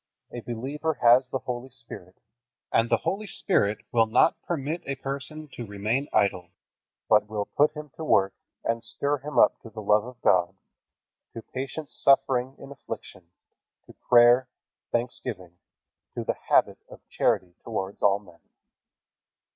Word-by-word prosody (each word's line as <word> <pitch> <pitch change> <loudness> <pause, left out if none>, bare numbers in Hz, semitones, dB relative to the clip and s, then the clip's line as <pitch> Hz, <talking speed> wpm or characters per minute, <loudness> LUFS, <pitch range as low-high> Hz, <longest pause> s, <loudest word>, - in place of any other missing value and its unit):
A 120 - -6
believer 135 +7 -3
has 125 +2 +6
the 135 - -1
Holy 125 +1 -4
Spirit, 115 -7 -11 0.6
and 115 +1 +2
the - - +4
Holy 210 +2 -3
Spirit 110 - 0
will 115 -1 +3
not 110 +8 +3
permit 160 +1 -3
a 140 - -2
person 140 +3 -6
to 120 - -6
remain 110 +8 -1
idle, 90 -3 +1 0.6
but 105 -1 +4
will 105 -1 -3
put 150 +6 +2
him 150 -1 -8
to 160 - -5
work 95 -10 +3 0.3
and 115 0 -1
stir 140 +5 -1
him 150 +3 -6
up - - +5
to 115 - -11
the 110 0 -9
love 105 +1 +4
of 125 -1 -11
God, 90 -1 +3 0.8
to 115 - -7
patient 135 +3 -6
suffering 135 -1 +2
in 135 - -11
affliction, 95 -9 -9 0.6
to - - -15
prayer, 120 +2 +5 0.4
thanksgiving, 115 -7 -3 0.6
to - - -3
the - - 0 0.2
habit - - +3
of - - -15
charity 90 -1 0
towards 100 -3 -4
all 100 -1 +4
men. 90 -5 -18
120 Hz, 150 wpm, -26 LUFS, 105-140 Hz, 0.8 s, has